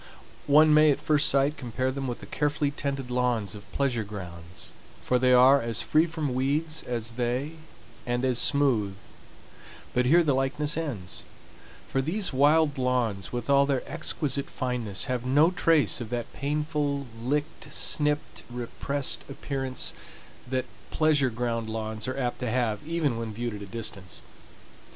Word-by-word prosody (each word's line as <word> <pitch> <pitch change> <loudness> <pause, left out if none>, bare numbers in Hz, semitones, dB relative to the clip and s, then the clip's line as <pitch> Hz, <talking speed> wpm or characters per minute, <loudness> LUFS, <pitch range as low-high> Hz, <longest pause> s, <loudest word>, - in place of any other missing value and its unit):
One 150 +2 +6
may 155 0 +6
at 140 - +2
first 150 -2 +3
sight 140 +2 +2
compare 130 +1 -2
them 135 0 -4
with 120 - -4
the - - -8
carefully 145 -1 0
tended 140 -3 -3
lawns 120 -5 0
of 105 -1 -11
pleasure 130 -5 0
grounds; 90 -4 -8 0.3
for 125 - +2
they 125 0 +3
are 130 +3 +7
as 115 -2 0
free 155 +2 +3
from 155 -5 -3
weeds 150 +5 0
as 115 -1 -4
they, 125 +4 -1 0.6
and 120 +1 0
as 125 -2 +2
smooth, 115 -9 +2 1.0
but 125 0 +2
here 170 +5 +6
the 145 -3 +2
likeness 140 +3 0
ends; 125 - -4 0.6
for 135 - 0
these 180 +5 0
wild 145 +1 +4
lawns, 120 -6 0
with 120 -1 -4
all 140 0 +4
their 135 -2 -1
exquisite 140 -3 -2
fineness, 120 -6 -2
have 125 -2 -2
no 145 +7 +4
trace 160 - +3
of 115 - -5
that 120 -1 -4
painful, 145 -1 -1 0.2
licked, 145 +5 -2
snipped, 150 0 0
repressed 125 +3 -2
appearance 135 -1 -3 0.6
that 130 0 -1 0.2
pleasure 150 -4 +3
ground 115 -1 -2
lawns 110 0 -3
are 130 +1 -3
apt 125 -3 -2
to 125 -2 -2
have 115 -3 0
even 155 -8 0
when 115 -1 -4
viewed 120 +2 -4
at 105 - -7
a 100 - -7
distance. 105 -4 -5
130 Hz, 155 wpm, -27 LUFS, 120-145 Hz, 1.0 s, are